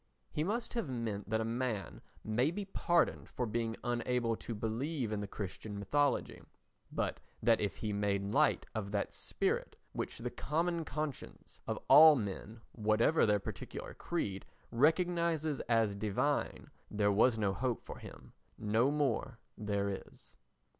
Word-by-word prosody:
He 150 Hz, -, -1 dB
must 225 Hz, +7 st, -2 dB
have 230 Hz, -, -2 dB
meant 110 Hz, -5 st, -3 dB
that 110 Hz, 0 st, +1 dB
a -, -, -1 dB
man 115 Hz, -3 st, -2 dB, 0.2 s
may 120 Hz, +6 st, +2 dB
be 200 Hz, +4 st, -4 dB
pardoned 175 Hz, -3 st, +1 dB
for 125 Hz, -, -2 dB
being 115 Hz, 0 st, -2 dB
unable 120 Hz, -1 st, 0 dB
to 115 Hz, -, -6 dB
believe 115 Hz, +4 st, -2 dB
in 105 Hz, -, -1 dB
the 100 Hz, -, -4 dB
Christian 100 Hz, +1 st, -6 dB
mythology, 145 Hz, +9 st, +1 dB, 0.5 s
but -, -, -1 dB, 0.2 s
that 115 Hz, -2 st, +4 dB
if 100 Hz, -2 st, -1 dB
he 105 Hz, -2 st, -3 dB
made 100 Hz, -1 st, 0 dB
light -, -, +3 dB
of 105 Hz, -2 st, -3 dB
that 100 Hz, -, -1 dB
spirit -, -, -1 dB, 0.2 s
which -, -, -3 dB
the -, -, -4 dB
common 165 Hz, +2 st, -1 dB
conscience 150 Hz, 0 st, -5 dB
of -, -, -1 dB
all 155 Hz, +2 st, +10 dB
men, 110 Hz, 0 st, -4 dB
whatever 110 Hz, +7 st, +3 dB
their 105 Hz, 0 st, +4 dB
particular 100 Hz, -, -6 dB
creed, 100 Hz, -, -3 dB, 0.3 s
recognises 160 Hz, +2 st, +2 dB
as 115 Hz, -3 st, +3 dB
divine, 110 Hz, +8 st, -1 dB, 0.2 s
there 105 Hz, -1 st, +2 dB
was 110 Hz, +3 st, +4 dB
no 100 Hz, -3 st, +1 dB
hope 120 Hz, +4 st, -1 dB
for -, -, -8 dB
him. -, -, -12 dB, 0.2 s
No 110 Hz, +5 st, +2 dB
more 135 Hz, -4 st, 0 dB, 0.2 s
there 100 Hz, -1 st, -1 dB
is. 95 Hz, -9 st, -7 dB
115 Hz, 150 wpm, -34 LUFS, 105-145 Hz, 0.5 s, all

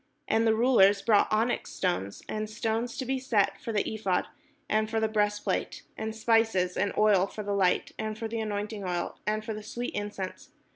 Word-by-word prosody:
And 225 Hz, +1 st, +2 dB
the 220 Hz, -, +4 dB
rulers 220 Hz, -4 st, +5 dB
brought 210 Hz, -2 st, +4 dB
onyx 225 Hz, +3 st, +1 dB
stones, 100 Hz, -, -2 dB
and 215 Hz, 0 st, -3 dB
stones 225 Hz, +2 st, -2 dB
to 260 Hz, -, -3 dB
be 265 Hz, +1 st, -1 dB
set, 225 Hz, -6 st, +1 dB
for 230 Hz, -, -4 dB
the 210 Hz, -2 st, +1 dB
ephod, 195 Hz, -4 st, 0 dB, 0.4 s
and 215 Hz, 0 st, +1 dB
for 225 Hz, 0 st, 0 dB
the 220 Hz, -, +2 dB
breastplate; 210 Hz, -1 st, -1 dB
and 220 Hz, 0 st, -4 dB
spice, 225 Hz, -1 st, +3 dB, 0.2 s
and 200 Hz, +1 st, +1 dB
oil 205 Hz, -3 st, +4 dB
for 215 Hz, -, -7 dB
the 205 Hz, 0 st, -2 dB
light, 190 Hz, -2 st, +2 dB
and 215 Hz, 0 st, -3 dB
for 225 Hz, 0 st, -3 dB
the 225 Hz, +1 st, -3 dB
anointing 210 Hz, -1 st, -3 dB
oil, 175 Hz, -2 st, -3 dB
and 215 Hz, 0 st, 0 dB
for 220 Hz, -, -3 dB
the 215 Hz, -, -6 dB
sweet 240 Hz, +3 st, -5 dB
incense. 205 Hz, -2 st, -5 dB
215 Hz, 195 wpm, -28 LUFS, 205-225 Hz, 0.4 s, rulers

